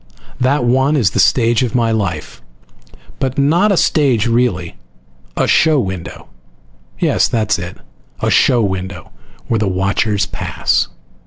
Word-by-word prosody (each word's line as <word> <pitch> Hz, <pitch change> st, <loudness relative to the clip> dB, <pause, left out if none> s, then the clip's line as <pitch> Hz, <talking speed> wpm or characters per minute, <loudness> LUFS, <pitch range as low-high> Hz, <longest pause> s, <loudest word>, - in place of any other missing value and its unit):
That 130 Hz, +1 st, +1 dB
one 130 Hz, +5 st, +2 dB
is 105 Hz, -9 st, +2 dB
the -, -, -2 dB
stage 115 Hz, -1 st, +3 dB
of 125 Hz, -1 st, -2 dB
my 115 Hz, -2 st, +1 dB
life. 105 Hz, -, -3 dB, 0.8 s
But 130 Hz, -2 st, -2 dB
not 165 Hz, +9 st, +3 dB
a 195 Hz, -, +1 dB
stage, 130 Hz, -11 st, +2 dB
really. 115 Hz, -8 st, 0 dB, 0.6 s
A -, -, +2 dB
show 155 Hz, -2 st, +3 dB
window. 95 Hz, -6 st, -6 dB, 0.7 s
Yes, -, -, +2 dB
that 110 Hz, -2 st, -2 dB
is 105 Hz, -, +2 dB
it. 90 Hz, +1 st, -7 dB, 0.4 s
A -, -, 0 dB
show 120 Hz, -2 st, +3 dB
window, 95 Hz, -1 st, -5 dB, 0.4 s
where 115 Hz, -, 0 dB
the 105 Hz, -, 0 dB
watchers 100 Hz, +2 st, 0 dB
pass. -, -, -1 dB
115 Hz, 145 wpm, -16 LUFS, 95-130 Hz, 0.8 s, stage